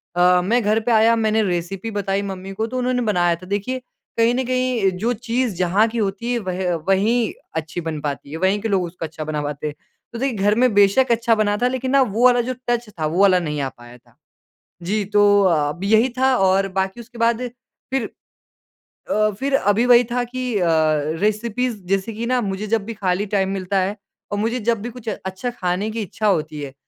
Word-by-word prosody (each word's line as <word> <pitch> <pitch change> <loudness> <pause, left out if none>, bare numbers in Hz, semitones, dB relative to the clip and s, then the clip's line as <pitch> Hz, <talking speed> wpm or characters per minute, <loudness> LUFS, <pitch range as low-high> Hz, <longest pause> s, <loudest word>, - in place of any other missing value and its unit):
अ, 180 0 +4
मैं 235 +7 +1
घर 215 +2 +2
पे 235 +2 -1
आया, 225 +1 +5
मैंने 220 -1 +1
रेसिपी 185 +4 -3
बताई 200 -1 -1
मम्मी 195 -1 -6
को, 220 +3 -2
तो 255 +2 -5
उन्होंने 250 0 0
बनाया 175 -2 +2
था। 185 +2 -13
देखिए, 205 +7 -3 0.4
कहीं 230 +1 +4
न 260 - 0
कहीं 255 -5 +1
जो 230 +5 0
चीज़ 240 -2 -2
जहाँ 185 +5 +2
की 235 - -5
होती 210 +3 -2
है, - - +1
वह 185 -3 -2
वहीं 215 +4 +2 0.2
अच्छी 160 +2 -3
बन 160 -2 -4
पाती 140 -1 -5
है। 160 - -4
वहीं 190 +3 +1
के 225 - -2
लोग 190 -2 +2
उसको 170 -1 -6
अच्छा 155 0 -7
बना 150 -1 -3
पाते 145 +1 -4
हैं। 150 - -5 0.4
तो 230 - -5
देखिए 260 -5 -1
घर 205 +2 +2
में 250 -2 +3
बेशक 205 +6 +4
अच्छा 230 0 +3
बना 205 -1 +1
था, 245 - +4
लेकिन 260 0 -2
ना 275 -1 +5
वो 230 0 0
वाला 245 -1 +5
जो 255 +2 -3 0.2
टच 240 -1 0
था, 160 -6 -4
वो 170 +5 0
वाला 185 -2 +5
नहीं 150 -3 -3
आ 135 - -1
पाया 120 0 -15
था। - - -28 0.7
जी, 205 +5 -1
तो 205 0 +4
अब 165 0 +1
यही 220 +5 +4
था 260 0 +3
और 195 +1 +3
बाकी 190 +4 -2
उसके 235 +1 -15
बाद 230 +1 +2 0.5
फिर 265 -5 -1 1.1
अ, 215 0 +3
फिर 275 +1 -2
अभी 205 +1 +2
वही 245 0 +6
था 245 0 0
कि 250 -1 -4
अ, 175 - +1 0.6
रेसिपीज़ 225 +2 0
जैसे 195 +3 -1
कि 230 +2 -4
ना 250 +1 +1
मुझे 200 +1 -3
जब 220 -2 0
भी 230 - -5
खाली 195 0 -1
टाइम 190 -1 +1
मिलता 195 0 -1
है 195 +3 -1 0.4
और 205 - -1
मुझे 230 +4 -1
जब 230 -1 0
भी 240 - -4
कुछ 230 -2 -6
अच्छा 190 +4 -4
खाने 190 -2 -2
की 225 0 -3
इच्छा 210 +2 -2
होती 155 -5 0
है, 135 -2 -7
205 Hz, 220 wpm, -21 LUFS, 185-235 Hz, 1.1 s, वही